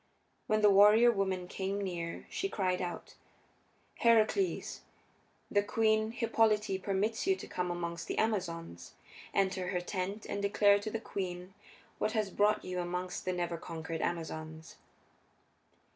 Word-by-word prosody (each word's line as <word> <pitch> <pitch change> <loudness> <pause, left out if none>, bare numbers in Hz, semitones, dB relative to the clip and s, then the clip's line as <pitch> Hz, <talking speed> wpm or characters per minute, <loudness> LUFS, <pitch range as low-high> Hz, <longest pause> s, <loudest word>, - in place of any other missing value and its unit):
When 215 0 +2
the 205 - +7
warrior 210 +4 +7
woman 190 -4 -1
came 195 +2 -3
near 175 -4 -4
she 390 - -2
cried 185 - 0
out, 175 -1 -5 0.9
"Heracles, 230 - +2 0.7
the 205 - +4
Queen 220 +1 +2
Hippolyte 220 -4 +1
permits 205 - -1
you 385 - +4
to - - -9
come 180 0 -3
amongst 170 -1 -4
the - - -3
Amazons. 170 - -2 0.4
Enter 190 -2 0
her 180 -1 -1
tent 190 +3 -4
and 200 - -3
declare 200 0 +4
to 210 +2 -4
the 225 - -3
queen 185 -3 -5 0.5
what 215 - 0
has 215 -4 0
brought 205 +2 +2
you 180 0 -3
amongst 180 +1 -3
the 185 - 0
never 175 -1 -2
conquered 160 0 -5
Amazons." 160 -1 -4
195 Hz, 140 wpm, -32 LUFS, 175-215 Hz, 0.9 s, the